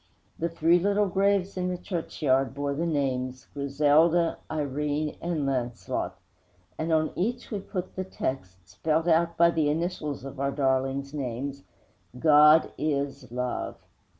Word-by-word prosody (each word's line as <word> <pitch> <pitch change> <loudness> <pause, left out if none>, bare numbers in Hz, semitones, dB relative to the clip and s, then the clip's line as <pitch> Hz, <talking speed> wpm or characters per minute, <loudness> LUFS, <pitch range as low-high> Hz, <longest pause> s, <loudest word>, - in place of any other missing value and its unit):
The 170 - 0
three 165 +1 +3
little 205 +3 +2
graves 195 0 +1
in 180 0 0
the 180 - -2
churchyard 135 - -1
bore 140 0 -1
the 165 +4 -1
names 130 -4 -1
Griselda, 150 +4 +3
Irene 150 0 -2
and 170 -4 -1
Launcelot; 125 -3 -2 0.6
and 160 +1 -1
on 155 -1 +2
each 240 +7 -2
we 210 - -2
put 185 -1 -5
the 185 - -2
text, 95 - -5
spelt 160 +1 -1
out 170 0 +3
by 170 0 +6
the 155 -3 +1
initials 150 -4 -2
of 135 0 -8
our 140 0 +1
darlings' 135 0 0
names: 140 0 -4 0.6
GOD 150 +2 +6
IS 140 -4 -2
LOVE. 125 0 -3
150 Hz, 140 wpm, -27 LUFS, 135-170 Hz, 0.6 s, by